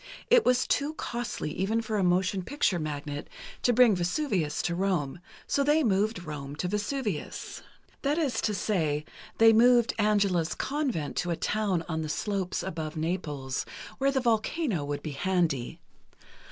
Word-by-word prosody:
It - - +7
was 250 0 +3
too 295 +2 0
costly, 235 - -4
even 195 +7 0
for 220 -2 -2
a - - +2
motion 185 +2 +2
picture 200 -5 0
magnate, 145 -1 -4 0.3
to 245 - +3
bring 240 -3 +6
Vesuvius 180 - -1
to 175 - 0
Rome, 175 -5 -1 0.3
so 280 - +1
they 300 +2 +3
moved 210 -2 +1
Rome 145 -3 -6
to 180 - -2
Vesuvius—that 210 - -4
is 275 -9 0
to 210 - 0
say, 155 -7 0 0.3
they 225 0 +7
moved 240 +1 +5
Angela's 200 -6 +2
convent 265 - -2
to 180 - 0
a 170 - +1
town 195 -3 0
on 160 -1 -2
the 155 - -4
slopes 195 +2 -2
above 160 -4 -4
Naples, 150 -5 -2 0.4
where 275 +1 +3
the 270 - +1
volcano 230 - 0
would 145 0 -4
be 155 - -4
handy. 155 -4 0
190 Hz, 155 wpm, -28 LUFS, 160-235 Hz, 0.4 s, It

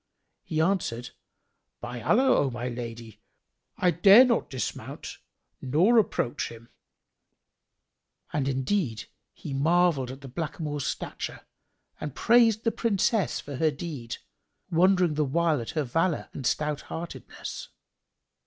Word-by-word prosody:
He 155 - -3
answered, 160 -9 0 0.7
"By 120 0 -6
Allah, 255 - +4
O 140 - +2
my 120 0 -4
lady, 115 -2 -7 0.6
I 180 - +3
dare 195 +9 +8
not 235 -2 +1
dismount 130 -2 -5 0.4
nor 175 - +4
approach 125 - -1
him." 115 0 -13 1.6
And 140 -3 0
indeed 135 - -1 0.3
he - - -8
marvelled 160 -2 +2
at 135 +2 -8
the 135 - -9
blackamoor's 150 0 -4
stature - - -5 0.6
and 150 -3 -5
praised 230 -2 +4
the 230 - +2
Princess 215 -3 +1
for 140 -2 -7
her 160 +2 +3
deed, 140 -6 -6 0.5
wondering 180 0 +4
the 150 0 +1
while 155 0 +1
at 115 - -7
her 155 - +2
valour 165 +6 0
and 135 -4 -3
stout 150 -1 -1
heartedness. 170 +1 -7
150 Hz, 125 wpm, -27 LUFS, 130-180 Hz, 1.6 s, dare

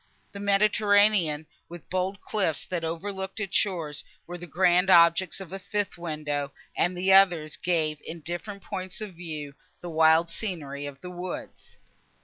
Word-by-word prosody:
The 200 - -8
Mediterranean, 205 -5 +3 0.2
with 175 0 -9
the - - -40
bold 185 +2 -2
cliffs, 190 -8 -1
that 175 -2 -3
overlooked 190 +4 -4
its 200 -3 -3
shores, 165 -8 0 0.2
were 175 - -7
the 175 - -8
grand 180 +3 +3
objects 170 0 +5
of 190 -2 -9
a 195 - -4
fifth 205 +1 -2
window, 150 -4 -3 0.2
and 180 +1 +1
the 190 +2 +3
others 175 -6 +5
gave, 160 -4 0
in 165 0 -8
different 180 +5 -6
points 185 0 -5
of 210 -3 -6
view, 155 -4 -7 0.3
the 175 - -7
wild 160 +1 +4
scenery 145 -10 -4
of 140 -1 -10
the 180 - -7
woods. 180 0 -7
175 Hz, 160 wpm, -27 LUFS, 160-195 Hz, 0.3 s, objects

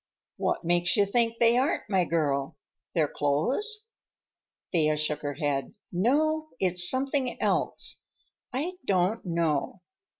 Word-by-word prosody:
"What - - -1
makes 175 0 +2
you 205 - +5
think 230 +3 +1
they 235 +1 +4
aren't, 280 +6 0
my 190 -3 +2
girl? 145 -5 -1 0.4
Their 160 -3 +3
clothes?" 265 - 0 0.8
Thea 155 -3 +2
shook 150 0 -1
her 145 -1 -3
head. 145 - -2 0.2
"No, 310 - +1
it's 180 -1 +4
something 265 -1 -1
else. - - -1 0.5
I 320 +8 -3
don't 190 +3 +1
know." 165 0 -1
185 Hz, 125 wpm, -27 LUFS, 155-255 Hz, 0.8 s, you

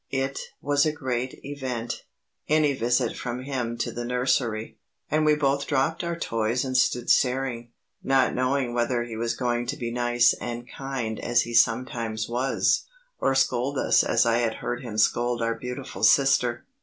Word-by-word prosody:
It 135 0 -2 0.2
was 145 0 +3
a 155 - +2
great 130 -4 -3
event 130 -5 -4 0.4
any 150 -2 +3
visit 120 -1 0
from 125 0 -5
him 125 -4 -3
to 115 - -2
the 120 - -5
nursery 120 -2 -1 0.3
and 155 +1 +2
we 150 - +5
both 140 -1 0
dropped 145 +4 0
our 170 0 -2
toys 115 -3 -1
and 130 -1 -3
stood 125 -1 +2
staring, 125 -2 +1 0.3
not 135 -1 +2
knowing 130 -1 0
whether 120 0 0
he 120 -1 -7
was 115 +1 -1
going 120 -1 -1
to 145 - -3
be 120 -1 -4
nice 120 0 +3
and 120 0 -5
kind 130 -5 -4
as 120 0 +2
he 120 - -7
sometimes 115 -1 +1
was, 125 +3 +1 0.3
or 135 - +1
scold 130 +1 +1
us - - +4
as - - +2
I 115 0 +3
had 115 -2 0
heard 120 +1 -4
him 115 -4 -6
scold 120 +2 +2
our 115 0 0
beautiful 125 +3 -7
sister. 125 -3 +3
125 Hz, 170 wpm, -25 LUFS, 120-135 Hz, 0.4 s, we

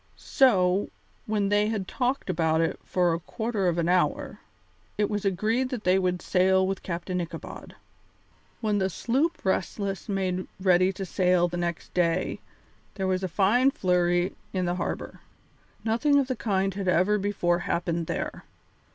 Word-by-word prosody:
So, 195 -7 +3 0.4
when 210 -2 0
they 205 +1 +3
had 210 -4 -2
talked 255 +4 -1
about 160 -1 +1
it 165 - 0
for 175 -2 +1
a 165 - -2
quarter 215 +2 -2
of 175 -1 +1
an 170 -1 +1
hour, 180 -4 0 0.6
it 210 +1 +1
was 210 -1 -2
agreed 220 +7 +1
that 245 -4 -4
they 185 +1 +3
would 180 -1 -1
sail 190 0 +3
with 195 0 -2
Captain 180 +1 -3
Ichabod. 170 - -8 0.9
When 210 -2 +1
the 190 0 +1
sloop 265 - -1
Restless 195 0 -2
made 185 -2 -1
ready 185 0 +4
to 195 0 -6
sail 180 -1 +2
the 175 0 -5
next 170 -1 -4
day 175 0 0 0.6
there 190 - -2
was 185 0 0
a 190 - -1
fine 210 +9 +3
flurry 180 -4 +1 0.2
in 185 -1 0
the 175 - 0
harbour. - - -4 0.6
Nothing 235 +6 +2
of 280 - +3
the 255 0 -2
kind 195 -4 0
had 195 0 -4
ever 185 +4 +3
before 190 -4 0
happened 170 -1 -2
there. - - -4
190 Hz, 160 wpm, -26 LUFS, 175-210 Hz, 0.9 s, ready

